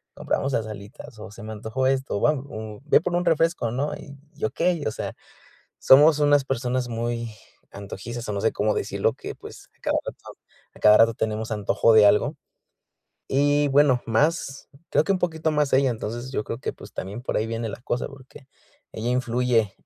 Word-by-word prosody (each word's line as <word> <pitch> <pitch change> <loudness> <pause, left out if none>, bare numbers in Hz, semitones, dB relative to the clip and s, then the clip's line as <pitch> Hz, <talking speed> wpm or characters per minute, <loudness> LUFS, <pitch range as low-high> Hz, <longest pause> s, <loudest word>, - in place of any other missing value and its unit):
compramos 135 0 -1
las 110 -3 -1
alitas". 110 +5 -10
O: 105 0 -9
"Se 110 - -12
me 110 0 -6
antojó 110 +5 -2
esto, 130 -6 -1
¿va?" 150 - +4
O: 110 -7 -7
"Ve 150 - +4
por 175 +1 -2
un 175 0 0
refresco", 165 -7 +1
¿no? 135 +5 -2
Y 140 0 -11 0.3
okey. 170 +6 0
O - - 0
sea, - - -5 0.6
somos 150 +3 +6
unas 145 -1 +4
personas 125 -1 -2
muy 115 0 -3 0.4
antojizas, 100 +4 -7
o - - -1
no 100 - -2
sé 110 - +2
cómo 105 +1 0
decirlo, - - -1
que, - - -7
pues, - - -12
a - - -43
cada - - 0
rato - - -7 0.6
a - - -15
cada 105 0 +7
rato 115 0 +5
tenemos 110 0 -3
antojo 105 +2 +2
de 110 -1 +8
algo. 100 +1 +3 0.9
Y 145 +1 +2
bueno, 135 -3 +4
más, 140 +3 0 0.2
creo - - +3
que - - +1
un 185 - -1
poquito 160 -2 -1
más 150 -2 +1
ella. 135 0 +4
Entonces 120 +3 -5
yo 105 - -2
creo 115 - -5
que, - - -4
pues, - - -13
también 100 +5 -6
por 125 - -2
ahí 110 - 0
viene 115 0 -3
la 105 - -7
cosa, 120 0 -2
porque 135 0 -15 0.5
ella 115 +2 -3
influye 125 -4 +1
125 Hz, 195 wpm, -24 LUFS, 110-140 Hz, 0.9 s, de